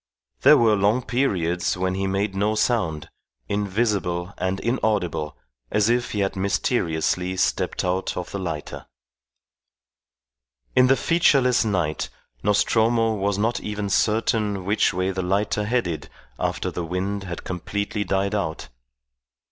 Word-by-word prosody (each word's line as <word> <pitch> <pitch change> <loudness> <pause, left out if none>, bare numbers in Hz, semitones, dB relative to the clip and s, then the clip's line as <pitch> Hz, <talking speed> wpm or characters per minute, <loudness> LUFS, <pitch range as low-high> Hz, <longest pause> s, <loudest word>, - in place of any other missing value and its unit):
There - - +8
were 110 -2 +4
long 105 +5 +2
periods 90 -10 0
when 95 0 0
he 95 +1 -1
made 95 +1 -1
no 105 +2 0
sound, 105 -10 0 0.4
invisible 100 -3 -1
and 95 +1 -1
inaudible 105 - -1 0.3
as 105 +1 +2
if 120 0 0
he 105 - 0
had 95 0 -1
mysteriously 95 -2 0
stepped 95 - 0
out 90 +1 -1
of 90 - -5
the 100 - -4
lighter. 85 -5 -5 1.9
In 125 - +6
the 135 +1 +4
featureless 140 -7 +3
night 90 -8 -1 0.3
Nostromo 115 - +2
was 100 -1 -1
not 115 +3 0
even 105 -1 -4
certain 105 -2 +1
which 105 +3 +2
way 95 +1 -1
the 95 0 -2
lighter 100 +3 0
headed 105 -8 -1 0.3
after - - -1
the 90 - -4
wind 95 +4 -3
had 85 -2 -6
completely 100 +3 -3
died 100 +1 0
out. 90 -6 -3
100 Hz, 130 wpm, -23 LUFS, 90-110 Hz, 1.9 s, There